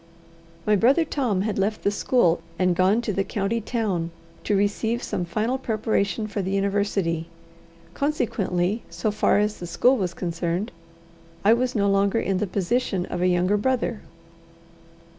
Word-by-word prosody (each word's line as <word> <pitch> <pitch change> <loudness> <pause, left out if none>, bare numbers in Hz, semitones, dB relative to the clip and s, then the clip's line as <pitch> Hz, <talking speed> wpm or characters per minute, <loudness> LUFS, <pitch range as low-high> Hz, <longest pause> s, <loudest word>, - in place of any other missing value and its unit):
My 210 - +4
brother 265 - +4
Tom 245 -11 0
had 205 -1 -1
left 210 +3 -1
the 200 - +2
school, 205 -5 +2 0.2
and 180 -1 +2
gone 190 +6 +3
to 210 - -1
the 195 - +1
county 205 +3 -2
town, 205 -7 -1 0.4
to 210 - +2
receive 220 +4 0
some 180 - -2
final 220 +9 -1
preparation 215 -2 -1
for 205 -1 -3
the 190 - -3
University; 195 -4 0 0.7
consequently, 210 -8 -1
so 215 - -2
far 205 - +2
as 210 +1 0
the 175 - -6
school 250 +9 +3
was 180 -5 -2
concerned, 170 +4 -2 0.7
I 215 - +7
was 250 +1 0
no 200 -2 +2
longer 200 +2 +2
in 195 -3 0
the 210 - -1
position 195 0 0
of 180 - -2
a 180 - +3
younger 180 +3 +2
brother. 235 -1 -1
205 Hz, 160 wpm, -24 LUFS, 185-225 Hz, 0.7 s, I